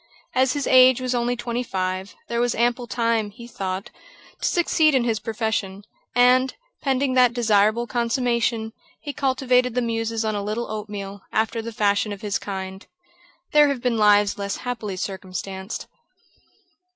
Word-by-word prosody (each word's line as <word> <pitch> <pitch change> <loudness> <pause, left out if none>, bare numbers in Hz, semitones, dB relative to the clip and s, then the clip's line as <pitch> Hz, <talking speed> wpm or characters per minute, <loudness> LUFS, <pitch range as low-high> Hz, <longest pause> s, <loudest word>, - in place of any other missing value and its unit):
As 260 0 +3
his 285 -2 -2
age 255 -1 +6
was 255 0 -2
only 240 0 0
twenty 240 0 -3
five, 185 -3 -3
there 235 0 -1
was 245 -1 +1
ample 240 +1 +1
time, 230 -2 0
he 235 +3 -12
thought, 190 -4 -4 0.5
to - - +1
succeed 315 -4 +3
in 255 - +3
his 225 -3 0
profession; 215 -3 -2 0.3
and, 250 +1 +4 0.3
pending 270 -1 +1
that 250 -2 +4
desirable 220 0 +3
consummation, 235 -2 0 0.3
he 290 - -5
cultivated 255 -3 +1
the 250 - +2
muses 225 -1 -1
on 215 - 0
a 205 - -2
little 215 +3 -3
oatmeal, 205 -2 -6
after 225 +1 0
the 230 +1 -6
fashion 205 -1 +1
of 200 -1 -7
his 205 -2 -1
kind. 190 -1 -6 0.6
There 300 -1 +6
have 275 -4 -2
been 245 -2 +1
lives 205 -1 +4
less 200 0 -2
happily 225 -6 -3
circumstanced. 190 +1 -5
230 Hz, 155 wpm, -23 LUFS, 205-250 Hz, 0.6 s, age